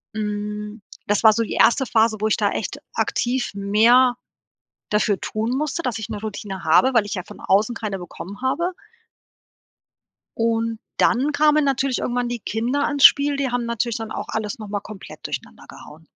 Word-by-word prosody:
Hm, 210 0 -4 0.3
das 205 0 +1
war 220 -1 +8
so 230 +1 0
die - - -5
1. 265 +2 +4
Phase, 220 -1 +2
wo 215 - +2
ich 220 - +1
da - - +1
echt - - -4 0.2
aktiv 245 +1 -1
mehr 230 +6 +4 0.8
dafür 210 -1 +1
tun 220 +2 -3
musste, 305 +3 -2
dass 245 -5 -2
ich 220 +1 -6
'ne 210 - -4
Routine 205 -3 -6
habe, 245 +12 +4
weil 230 - +4
ich - - -7
ja 180 -3 -4
von - - -13
außen 210 +5 +2
keine 205 -4 -4
bekommen 180 +3 -9
habe. 340 +8 0 1.6
Und 230 0 0 0.2
dann 270 +5 +2
kamen 300 0 +3
natürlich 270 -1 0
irgendwann 245 0 -1
die 240 0 -3
Kinder 240 +7 -1
ins 285 -2 +1
Spiel, 285 0 +6
die 275 -2 -1
haben 245 0 -1
natürlich 235 0 -1
dann 225 -1 -6
auch - - -5
alles 220 -1 -3
noch 215 -2 -8
mal 205 0 -3
komplett 210 -1 -10
durcheinander - - -7
gehauen. 160 +2 -13
225 Hz, 180 wpm, -22 LUFS, 210-255 Hz, 1.6 s, war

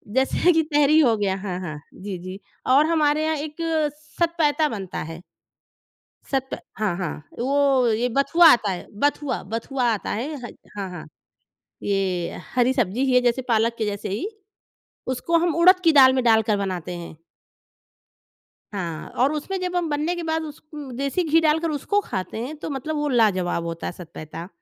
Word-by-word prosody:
जैसे 265 +6 +3
कि 320 - +4
तहरी 295 +2 +5
हो 240 -7 +4
गया 195 -2 0
हाँ, 190 -2 -4
हाँ। 155 -5 -6
जी, 195 -1 -6
जी। 185 +2 -8 0.3
और 275 +4 +5
हमारे 310 -2 +2
यहाँ 315 0 +1
एक 300 +1 -6 0.6
सतपैता 320 -2 +2
बनता 195 -6 -5
है। 165 +2 -9 1.1
सत 265 -1 -1 0.3
हाँ, 205 -5 0
हाँ। 175 -5 -3 0.3
वो 270 0 +2
ये 235 +3 +1
बथुआ 330 +5 +5
आता 220 -4 +1
है 180 -2 -5
बथुआ 290 -2 0
बथुआ 250 +3 -2
आता 210 - -3
है, 270 +8 -3
ह - - -9 0.3
हाँ, 195 -2 -3
हाँ। 175 -4 -8 0.8
ये 190 -3 -1 0.2
हरी 250 +1 +3
सब्ज़ी 245 -1 0
ही 260 - +1
है 250 - +5
जैसे 245 +1 +1
पालक 230 -1 +2
के 220 - -1
जैसे 205 0 -3
ही, 205 - -2 0.9
उसको 335 +7 0
हम 335 - 0
उड़द 365 +3 +6
की 325 - +6
दाल 265 -3 +8
में 260 - +1
डालकर 220 -2 +4
बनाते 185 -3 -3
हैं। 170 -2 -9 1.6
हाँ 170 -5 -4
और 275 +3 +3
उसमें 310 +6 -3
जब 360 0 -2
हम 345 -2 0
बनने 300 +4 0
के 345 - -4
बाद 320 0 -1
उस 300 -1 -9
उम 290 -3 -7
देसी 275 +7 0
घी 325 +2 +5
डालकर 320 +1 +2
उसको 310 +8 0
खाते 190 - -5
हैं, 295 +6 -5
तो 305 - -6
मतलब 290 +3 -3
वो 295 0 0
लाजवाब 190 -9 +2
होता 165 0 -5
है - - -3
सतपैता। 165 -1 -9
255 Hz, 180 wpm, -23 LUFS, 195-300 Hz, 1.6 s, दाल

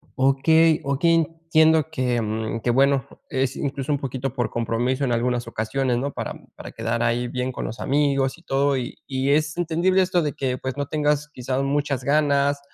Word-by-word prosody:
Okey, 155 +4 +4
okey, 140 +5 +2
entiendo 160 -1 +2
que, 125 -6 0
mm, 110 +1 -3
que 120 - -1
bueno, 135 +1 +3 0.2
es 130 0 -1
incluso 140 0 -3
un 145 - +1
poquito 135 -1 -4
por 125 -2 -1
compromiso 120 +4 -1
en 125 - -1
algunas 120 0 0
ocasiones, 120 +3 -1
¿no?, 140 +3 -2
para - - -4 0.2
para - - -9
quedar 115 +1 -2
ahí 120 +1 0
bien 125 +1 -3
con - - -5
los 115 - -6
amigos 140 -1 +1
y 170 - -20
todo, 140 0 +1
y 125 -1 -4
y 135 0 -1
es 155 +1 +1
entendible 175 +3 +2
esto 180 -1 +2
de 150 -2 -2
que 130 -2 -2
pues, 130 0 -4
no 145 -1 -2
tengas 150 -1 0
quizá 130 -1 -3
muchas 140 -1 -1
ganas, 140 0 +2
135 Hz, 190 wpm, -23 LUFS, 125-150 Hz, 0.2 s, Okey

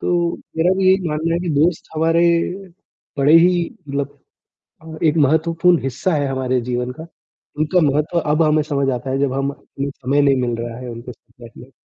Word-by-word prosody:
तो, 175 -1 0 0.2
मेरा 170 +3 +3
भी 190 - 0
यही 190 -2 +2
मानना 160 +2 -1
है 170 - -1
कि 175 - -4
दोस्त 160 +4 +1
हमारे, 165 +2 +2 1.0
बड़े 140 +2 +4
ही 175 0 +3 0.2
मतलब 140 0 -4 0.6
अ, - - -16 0.2
एक 155 -1 +2
महत्वपूर्ण 165 +3 +2
हिस्सा 135 +7 -1
है 145 -2 0
हमारे 130 -1 -1
जीवन 125 +1 -3
का। 160 +5 -10 0.5
उनका 155 +4 +2
महत्व 150 +4 0
अब 155 +2 +1
हमें 155 0 +3
समझ 140 -3 -1
आता 125 +2 -5
है 135 - -1
जब 140 -1 0
हम 135 +1 -1
हमें 140 0 -7
समय 140 +1 -1
नहीं 140 -1 +3
मिल 120 -1 -1
रहा 115 0 -5
है 125 - -8
उनके 120 +2 -8
साथ 120 +1 -28
बैठने 120 0 -12
के। 130 - -21
145 Hz, 200 wpm, -19 LUFS, 130-165 Hz, 1.0 s, बड़े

